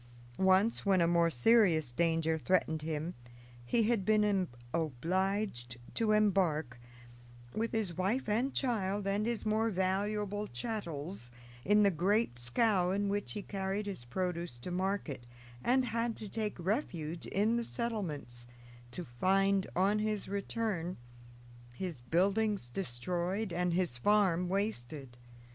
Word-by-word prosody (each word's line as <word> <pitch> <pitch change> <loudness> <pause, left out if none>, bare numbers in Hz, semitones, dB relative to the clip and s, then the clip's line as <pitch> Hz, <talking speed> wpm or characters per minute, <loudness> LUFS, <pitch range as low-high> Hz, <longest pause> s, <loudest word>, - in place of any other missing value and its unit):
Once, 190 +4 +4
when 195 -2 +3
a 170 - +4
more 170 0 +3
serious 165 - +4
danger 160 +3 +1
threatened 160 -1 +1
him, 160 +2 -3 0.5
he 225 - +2
had 220 -2 +2
been 210 -3 +3 0.3
obliged 165 - -1 0.2
to 225 -2 +1
embark, 180 -11 +2 0.7
with 225 +1 -1
his 210 -7 -1
wife 200 +8 0
and 235 +6 0
child 205 -6 0
and 200 +2 0
his 235 -2 -2
more 220 +1 +2
valuable 205 +2 -1
chattels, 160 - -5 0.3
in 210 +2 +5
the 200 - +5
great 190 - +1
scow 180 - +2
in 200 +1 0
which 205 0 -2
he 205 - -5
carried 195 +1 -2
his 195 -11 -5
produce 170 0 -3
to 120 +9 -7
market, 180 -9 -2 0.4
and 255 +1 +3
had 230 0 -1
to 215 - -7
take 215 +1 -3
refuge 175 - -2
in 215 +4 +2
the 235 - 0
settlements, 165 - -4 0.4
to 175 +9 -6
find, 195 +10 +2
on 200 +4 +3
his 215 -1 -1
return, 200 -3 -2 0.8
his 165 -1 -5
buildings 195 - +1
destroyed 180 - -2
and 175 0 0
his 175 -10 0
farm 185 0 +3
wasted. 145 - -3
190 Hz, 130 wpm, -33 LUFS, 165-210 Hz, 0.8 s, in